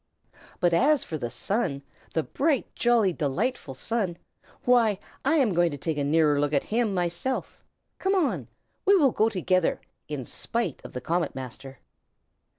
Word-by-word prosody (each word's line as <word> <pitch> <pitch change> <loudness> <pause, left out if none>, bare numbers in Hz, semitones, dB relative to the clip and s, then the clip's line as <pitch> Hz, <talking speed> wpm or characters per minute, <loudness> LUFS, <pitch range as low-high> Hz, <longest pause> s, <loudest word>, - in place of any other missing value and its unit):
] - - -24
But 175 -1 +3
as 280 - +4
for 155 - -5
the 120 - -3
Sun, 160 - -1 0.3
the 160 - +2
bright, 285 - 0
jolly, 235 -6 +3
delightful 150 - -2
Sun, 195 - -1 0.5
why, 235 -5 +4 0.3
I 285 +4 +3
am 260 - +3
going 175 0 +3
to 145 - -5
take 150 +1 -2
a - - +1
nearer 150 0 +3
look 145 0 0
at 140 - +2
him 230 -2 +2
myself. 175 +9 -2 0.4
Come 385 +1 +1
on! 350 -7 0 0.4
We 400 - +5
will 290 -9 +5
go 220 +1 +2
together, 185 -3 +1 0.3
in 145 -4 -4
spite 230 - -3
of - - -10
the 125 - -4
Comet 170 +3 -1
Master." 130 +1 -8
180 Hz, 165 wpm, -27 LUFS, 145-240 Hz, 0.5 s, We